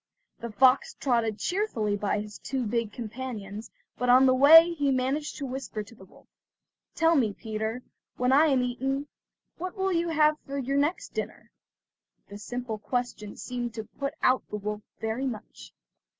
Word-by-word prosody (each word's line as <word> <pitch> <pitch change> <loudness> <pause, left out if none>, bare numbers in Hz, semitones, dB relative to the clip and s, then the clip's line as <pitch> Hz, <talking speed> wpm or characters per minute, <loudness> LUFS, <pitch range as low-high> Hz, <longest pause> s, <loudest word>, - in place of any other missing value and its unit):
The 235 -1 -6
fox 255 +4 +4
trotted 230 -5 0
cheerfully 245 - -1
by 205 0 -1
his 210 0 -9
two 265 -2 -3
big 230 0 -1
companions, 220 -2 -6 0.3
but 250 - 0
on 255 +2 +7
the 260 - +5
way 320 +6 +8
he 290 -4 0
managed 270 +3 -1
to 285 - -4
whisper 260 -5 -5
to 205 - -16
the 190 -4 -15
wolf: - - -21 0.7
"Tell 330 0 +4
me, 230 -8 +2
Peter, 220 +3 -4 0.3
when 250 +1 +1
I 295 +4 +6
am 265 -4 +2
eaten, 270 +3 -2 0.5
what 370 +3 -5
will 385 0 0
you 340 0 0
have 305 -1 +3
for 275 0 -7
your 275 +1 -1
next 295 +5 0
dinner?" - - -6 0.8
This 205 +1 -9
simple 245 -3 -4
question 245 -3 -4
seemed 240 -2 -5
to 220 - -4
put 275 +6 -5
out 255 0 +4
the 210 - -3
wolf 210 +1 -4 0.2
very 225 +5 -2
much. 225 -5 -8
250 Hz, 170 wpm, -27 LUFS, 220-280 Hz, 0.8 s, way